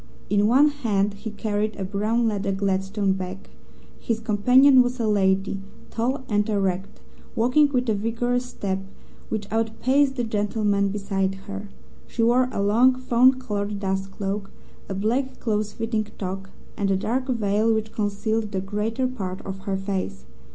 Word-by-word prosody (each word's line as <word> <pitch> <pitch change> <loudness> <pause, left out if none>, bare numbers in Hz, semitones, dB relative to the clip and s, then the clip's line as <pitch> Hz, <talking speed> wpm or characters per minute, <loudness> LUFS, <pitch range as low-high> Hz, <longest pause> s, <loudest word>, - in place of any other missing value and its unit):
In 205 0 +4
one 275 +6 +6
hand 210 -8 0
he 205 +3 -7
carried 210 0 -2
a 195 - -4
brown 215 +4 0
leather 200 -2 -1
Gladstone 195 +1 0
bag. 190 0 -6 0.5
His 230 -1 -1
companion 250 +5 +5
was 245 +1 -1
a 225 - +1
lady, 195 -1 +1 0.3
tall 255 +4 -1
and 210 0 +1
erect, 195 -2 -1 0.4
walking 255 +6 +4
with 250 -2 0
a 220 - +3
vigorous 235 +4 -1
step 195 -6 -3 0.5
which 215 -2 -2
outpaced 250 +5 +2
the 245 - -1
gentleman 205 -2 +1
beside 195 -1 -1
her. 200 0 -6 0.4
She 230 - -1
wore 250 +2 +4
a 200 - -1
long, 240 +6 +5
fawn 255 +1 +4
coloured 205 -4 -3
dust 195 -1 -2
cloak, 195 0 -4 0.4
a 195 - -3
black, 240 +7 -1
close 215 -2 -1
fitting 220 -1 -2
toque, 195 0 -5 0.3
and 200 -2 0
a 195 - +2
dark 245 +6 -1
veil 220 -2 +1
which 220 -1 -1
concealed 210 +1 -1
the 190 - 0
greater 210 +6 -2
part 195 -8 -4
of 190 0 -5
her 195 -1 -1
face. 190 - -4
210 Hz, 160 wpm, -24 LUFS, 195-235 Hz, 0.5 s, one